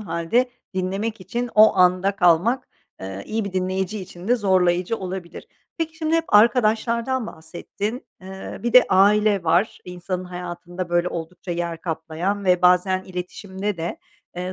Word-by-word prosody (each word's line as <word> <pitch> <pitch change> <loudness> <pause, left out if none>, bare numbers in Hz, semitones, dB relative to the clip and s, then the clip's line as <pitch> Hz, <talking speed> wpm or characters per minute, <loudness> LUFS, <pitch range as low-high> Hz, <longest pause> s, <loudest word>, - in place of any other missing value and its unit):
hâlde 190 +7 0 0.2
dinlemek 195 +4 -2
için 240 +6 -4
o 215 0 +7
anda 185 +2 +3
kalmak, 180 +8 +3 0.3
eee, 95 +1 -6
iyi 220 0 -2
bir 200 - -5
dinleyici 190 +2 -2
için 180 +1 -10
de 245 - +4
zorlayıcı 185 -1 +2
olabilir. 185 -3 -7 0.3
Peki, 325 -1 -3
şimdi 320 0 -1
hep 330 - 0
arkadaşlardan 235 +2 +3
bahsettin. 200 - -6
Eee, 190 +1 -8
bir 240 - -1
de 250 +1 +8
aile 205 0 +4
var, 170 +6 +2
insanın 180 +1 -5
hayatında, 180 0 -6
böyle, 175 +1 +1
oldukça 175 +2 -7
yer 170 -1 -3
kaplayan 165 +5 -3
ve 180 -1 +3
bazen 180 +1 +4
iletişimde 190 +2 -5
de, 165 +1 -4 0.4
eee, 180 +1 -4
185 Hz, 145 wpm, -22 LUFS, 175-215 Hz, 0.4 s, de